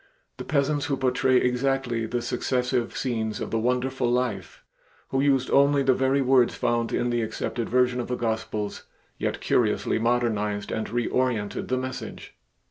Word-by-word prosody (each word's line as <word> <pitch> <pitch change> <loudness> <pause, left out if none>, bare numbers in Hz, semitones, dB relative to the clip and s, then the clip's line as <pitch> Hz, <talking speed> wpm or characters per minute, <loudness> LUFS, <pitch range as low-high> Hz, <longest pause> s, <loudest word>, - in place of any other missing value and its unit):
The - - -6
peasants 145 0 +1
who 140 -2 0
portrayed 130 0 +2
exactly 125 -2 0
the 120 +1 -2
successive 125 0 -1
scenes 110 -4 -2
of - - -5
the 115 - +1
wonderful 125 +1 0
Life, 120 -8 -2 0.5
who 135 - +1
used 135 -2 +2
only 140 0 +4
the 130 -1 +4
very 135 +2 +2
words 130 -2 +4
found 120 -1 0
in 120 - 0
the 120 0 +1
accepted 115 +1 -3
version 125 0 +2
of 120 - -3
the 125 - -1
Gospels, 110 -3 -3 0.3
yet - - -2
curiously - - +1
modernized 110 -3 0
and 110 - -2
reorientated 120 -2 -1
the 130 - 0
message. 130 0 -6
125 Hz, 155 wpm, -25 LUFS, 115-130 Hz, 0.5 s, only